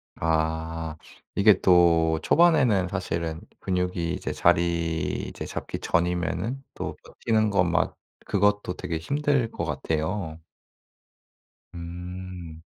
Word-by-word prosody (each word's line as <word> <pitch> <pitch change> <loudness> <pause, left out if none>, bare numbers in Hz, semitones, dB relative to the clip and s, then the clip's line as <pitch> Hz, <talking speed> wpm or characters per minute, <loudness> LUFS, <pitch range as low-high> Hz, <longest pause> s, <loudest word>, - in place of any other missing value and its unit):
아. 80 0 -1 0.4
이게 100 -1 +6
또 85 -3 +5
초반에는 135 - +4
사실은 85 -4 -3 0.2
근육이 90 -2 -1
이제 95 - -3
자리 85 -2 +1
이제 - - -7
잡기 - - -5
전이면은 90 +9 -1
또 - - -5
버티는 110 -2 0
것 100 -3 +4
막 85 0 +1 0.3
그것도 100 -1 +1
되게 85 - -3
힘들 140 - 0
것 - - -4
같아요. 80 +1 -2 1.4
음. 90 -1 -7
90 Hz, 205 characters per minute, -26 LUFS, 80-100 Hz, 1.4 s, 이게